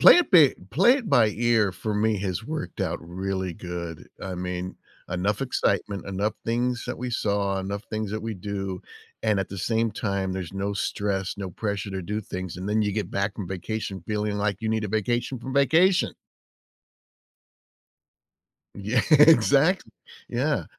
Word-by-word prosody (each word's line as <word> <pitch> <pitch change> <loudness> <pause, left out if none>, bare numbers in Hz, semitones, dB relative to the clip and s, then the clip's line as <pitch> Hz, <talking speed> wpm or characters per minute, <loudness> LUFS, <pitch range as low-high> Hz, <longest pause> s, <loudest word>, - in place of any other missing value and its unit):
Play - - +10
it 355 - +2
bi 160 -8 +7 0.2
play 190 - +5
it 230 - -6
by 115 -8 +5
ear 115 -2 +2
for 105 +3 -3
me 105 0 +2
has 95 +2 -3
worked 155 +4 -5
out - - -1
really 95 +2 -3
good. 85 -3 -6
I 95 -1 -4
mean, 90 0 -4 0.3
enough 100 +3 0
excitement, 100 -6 0
enough 100 +2 -1
things 120 +1 0
that 125 - -4
we 125 0 -3
saw, 100 -3 0
enough 100 +2 -4
things 110 -2 -2
that 110 - -3
we 115 -1 -3
do, 95 -1 -4 0.4
and 110 -2 +2
at 95 - -1
the 100 - -7
same 115 +4 +1
time, 100 -3 -2
there's 95 -2 -5
no 100 +1 -2
stress, 100 -1 -1
no 95 -2 -5
pressure 100 +1 -3
to 95 -1 -4
do 105 +4 -2
things. 95 -3 -6
And 95 +2 -5
then 110 +1 +2
you 105 -1 0
get 105 -3 -2
back 100 +1 -1
from 100 - -5
vacation 95 0 -4
feeling 105 -1 -1
like 100 -1 0
you 110 - -2
need 110 -1 0
a - - -3
vacation 120 +5 -1
from 130 +3 -6
vacation. 165 +7 +4 2.6
Yeah, 105 +5 0
exactly. 155 +2 +6 0.4
Yeah. - - 0
105 Hz, 170 wpm, -26 LUFS, 95-115 Hz, 2.6 s, Play